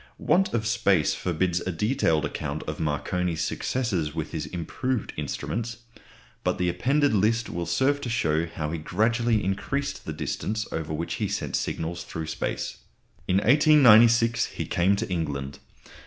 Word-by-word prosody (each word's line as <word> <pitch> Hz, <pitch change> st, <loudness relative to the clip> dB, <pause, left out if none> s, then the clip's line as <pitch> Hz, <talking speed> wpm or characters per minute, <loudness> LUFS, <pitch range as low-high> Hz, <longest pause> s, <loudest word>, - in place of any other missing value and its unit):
Want 190 Hz, +2 st, +2 dB
of 110 Hz, -2 st, -1 dB
space 100 Hz, -8 st, +2 dB
forbids 90 Hz, 0 st, 0 dB
a 95 Hz, -, -3 dB
detailed 85 Hz, -, +1 dB
account 70 Hz, +2 st, -4 dB
of 75 Hz, 0 st, -5 dB
Marconi's 80 Hz, +3 st, -1 dB
successes 90 Hz, -, -1 dB
with 80 Hz, -2 st, -3 dB
his 80 Hz, -2 st, -4 dB
improved 115 Hz, +8 st, -3 dB
instruments, 110 Hz, -, -4 dB, 0.7 s
but -, -, 0 dB
the 90 Hz, -1 st, +1 dB
appended 135 Hz, +10 st, +2 dB
list 110 Hz, +3 st, +1 dB
will 85 Hz, 0 st, -3 dB
serve 140 Hz, +2 st, +1 dB
to 125 Hz, -, -4 dB
show 85 Hz, -8 st, +1 dB
how 75 Hz, -2 st, -4 dB
he 85 Hz, -, -3 dB
gradually 110 Hz, +6 st, +1 dB
increased 135 Hz, +9 st, -2 dB
the -, -, -4 dB
distance 110 Hz, +7 st, -3 dB
over 80 Hz, -1 st, -3 dB
which 80 Hz, +2 st, -3 dB
he -, -, +1 dB
sent -, -, -3 dB
signals 85 Hz, +1 st, -3 dB
through 80 Hz, -1 st, -5 dB
space. 80 Hz, -, -3 dB, 0.5 s
In 90 Hz, -, +2 dB
1896 115 Hz, -2 st, +6 dB
he -, -, -5 dB
came 95 Hz, +3 st, +2 dB
to -, -, -3 dB
England. 70 Hz, -6 st, -3 dB
95 Hz, 155 wpm, -26 LUFS, 80-115 Hz, 0.7 s, 1896